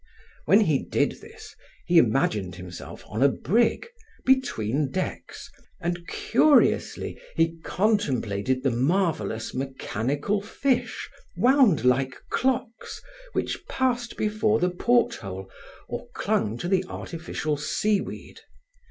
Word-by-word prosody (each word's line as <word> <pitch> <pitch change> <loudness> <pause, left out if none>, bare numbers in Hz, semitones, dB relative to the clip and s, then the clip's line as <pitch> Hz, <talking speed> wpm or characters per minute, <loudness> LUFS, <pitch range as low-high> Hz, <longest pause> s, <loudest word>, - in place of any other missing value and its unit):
When - - +6
he - - +3
did - - -1
this, 440 -1 -13 0.3
he 175 -1 +6
imagined 110 - +1
himself 90 -1 -9
on 110 +4 -4
a 140 - +6
brig, 225 - +1 0.4
between 150 - +1
decks, 185 +6 -5 0.3
and 175 -1 -3
curiously 305 - +2
he 165 0 +1
contemplated 130 - 0
the 135 - +2
marvelous, 155 - 0
mechanical 135 - -2
fish, 245 +5 -1 0.3
wound 245 - +4
like 130 +1 +2 0.2
clocks, 250 -3 -1 0.3
which - - -2
passed 245 -2 -1
before 215 0 +1
the 180 0 +1
porthole 100 - 0 0.4
or - - -6
clung 110 +2 0
to 175 - -4
the 190 0 +2
artificial 160 -3 -4
sea 200 +8 0
weed. - - -9
165 Hz, 110 wpm, -26 LUFS, -, 0.4 s, When